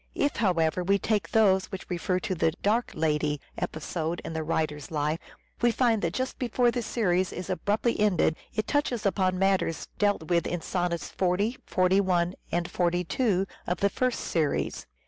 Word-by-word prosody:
If, 285 0 0
however, 180 -4 +2
we 200 +2 +3
take 210 +1 0
those 195 -4 +4
which 190 -2 -7
refer 180 +1 -1
to 190 - -2
the 165 -2 +2
" 165 - -18
dark 225 +4 +2
lady 150 -2 0
" - - -31
episode 160 +1 -4
in - - -5
the 160 - -2
writer's 155 -2 -2
life, 150 +1 -1 0.4
we 240 - +5
find 230 -2 +2
that 170 0 -1
just 260 0 -2
before 245 0 +2
the 245 - -2
series 185 -6 +1
is 180 0 -5
abruptly 210 +5 0
ended 190 -6 +3 0.2
it 215 - -1
touches 250 -7 0
upon 185 -2 +1
matters 190 -3 +1
dealt 205 -5 +2
with 170 0 +2
in 175 -1 -2
sonnets 175 -3 -2
40, 195 +6 0
41, 185 -1 +2 0.2
and 175 0 0
42 180 +4 +1 0.2
of 180 - -1
the 200 - +3
first 255 +3 0
series. 155 -4 -1
185 Hz, 175 wpm, -27 LUFS, 170-210 Hz, 0.4 s, we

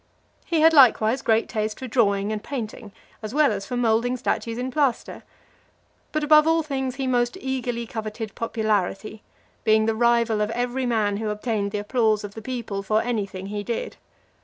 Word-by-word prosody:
LIII. 335 - +1
He - - +3
had 325 0 +7
likewise 255 -3 +5
great 225 0 +2
taste 215 -1 -3
for 260 - -7
drawing 210 -4 +1
and 215 -1 -4
painting, 225 -5 -6 0.3
as 215 +3 -6
well 300 -4 +4
as 195 -1 -4
for 250 - -3
moulding 240 +1 +1
statues 230 -2 -2
in 255 +1 -3
plaster. 275 -3 -1 0.9
But, 310 0 -1
above 305 +1 +6
all 325 0 +3
things, 265 -3 -3
he 270 -1 -3
most 245 -1 0
eagerly 245 -3 -3
coveted 220 -1 -6
popularity, 215 -2 -2 0.4
being 220 0 +4
the 225 - +1
rival 235 -1 +2
of 210 - 0
every 245 +2 -2
man 210 -4 +1
who 220 0 -3
obtained 210 -1 -2
the 210 - -3
applause 215 0 +1
of 205 -1 -7
the 220 - -8
people 230 -4 -4
for 215 +2 +1
any 225 -5 -1
thing 190 0 -8
he 205 +1 -4
did. 230 +3 -4
230 Hz, 185 wpm, -24 LUFS, 215-255 Hz, 0.9 s, had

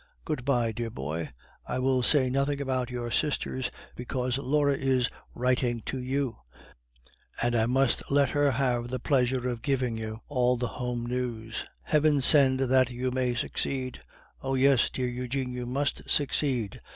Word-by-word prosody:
Good 150 -5 -3
bye, 120 -5 +2
dear 115 +1 -4
boy; 75 -1 -4 0.4
I - - -2
will 130 0 +2
say 130 +1 +5
nothing 140 +2 0
about 130 -3 -1
your 120 -1 -4
sisters, 130 -3 -1 0.3
because 125 +1 -2
Laure 145 +1 +2
is 130 -2 +1 0.2
writing 125 -1 0
to 130 - -4
you, 130 0 -2 1.0
and 120 0 +1
I 110 -1 +2
must 130 0 +2
let 140 -1 +3
her 145 -1 +2
have 125 -2 0
the 130 +1 -3
pleasure 125 -1 +1
of 120 -2 -3
giving 130 -5 0
you 110 0 -6
all 125 -3 +2
the 125 - -2
home 125 -1 -4
news. 120 -2 -3 0.2
Heaven 150 -1 +3
send 135 -1 +6
that 130 0 +3
you 125 +1 -2
may 125 -1 0
succeed! 130 +1 -2 0.4
Oh! 135 0 -1
yes, 135 -2 +4
dear 130 -1 -2
Eugene, 125 +1 -3
you 125 -1 -5
must 140 +3 -2
succeed. 130 -7 0
125 Hz, 160 wpm, -28 LUFS, 120-135 Hz, 1.0 s, send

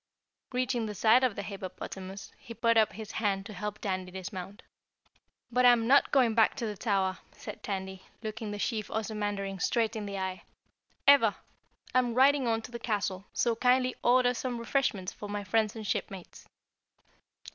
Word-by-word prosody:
Reaching 250 -2 0
the 210 - -5
side 225 +6 +5
of 250 -6 +2
the - - -4
hippopotamus, 190 0 -7
he 230 - -10
put 230 0 +2
up 220 -3 +4
his 220 +1 -8
hand 195 -3 -1
to 210 - -8
help 210 0 -4
Tandy 185 -3 -3
dismount. 190 +2 -7 0.9
"But 250 +1 +2
I'm 240 -2 +6
not 275 +4 +5
going 250 -5 +4
back 225 -1 +4
to 245 - -3
the 210 -1 -3
Tower!" 195 -3 0
said - - -9
Tandy, 190 -2 -4 0.2
looking 220 0 -4
the 205 - -4
Chief 215 0 -2
Ozamandarin 205 -3 -3
straight 230 +1 +1
in 210 -2 -4
the 200 0 -4
eye. 190 -1 -3 0.6
"Ever! 270 -7 +6 0.6
I'm 245 -2 +2
riding 270 0 +4
on 225 -1 0
to 245 - -9
the 235 - -6
castle, 205 -4 -2
so 235 -1 +1
kindly 255 +2 +3
order 245 0 +4
some 250 0 -3
refreshments 230 -6 -1
for 205 - -9
my 205 0 -3
friends 215 +2 +1
and 220 -1 -6
shipmates." 195 -2 -5
215 Hz, 170 wpm, -30 LUFS, 195-240 Hz, 0.9 s, I'm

